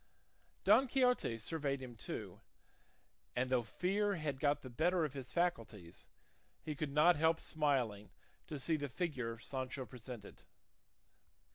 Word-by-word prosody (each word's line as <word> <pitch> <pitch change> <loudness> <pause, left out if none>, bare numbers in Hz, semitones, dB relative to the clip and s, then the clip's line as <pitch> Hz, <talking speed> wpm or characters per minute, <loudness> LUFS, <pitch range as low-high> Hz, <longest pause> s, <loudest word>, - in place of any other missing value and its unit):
Don 270 - +6
Quixote 250 - +2
surveyed 140 +3 -2
him 125 -2 -8
too, 110 - -6 0.9
and 130 +1 0
though 125 -2 +4
fear 200 - 0
had 150 -5 -3
got 145 0 +2
the 130 - -7
better 170 +6 +2
of 145 - -5
his 130 -3 -7
faculties, 115 - -2 0.6
he 155 - -3
could 150 0 -3
not 155 +4 +5
help 160 +1 +3
smiling 130 -10 0 0.4
to 155 - -4
see 155 +4 +1
the 145 -1 -3
figure 125 -7 -2
Sancho 130 +2 -4
presented. 120 -2 -9
140 Hz, 135 wpm, -37 LUFS, 125-165 Hz, 0.9 s, Don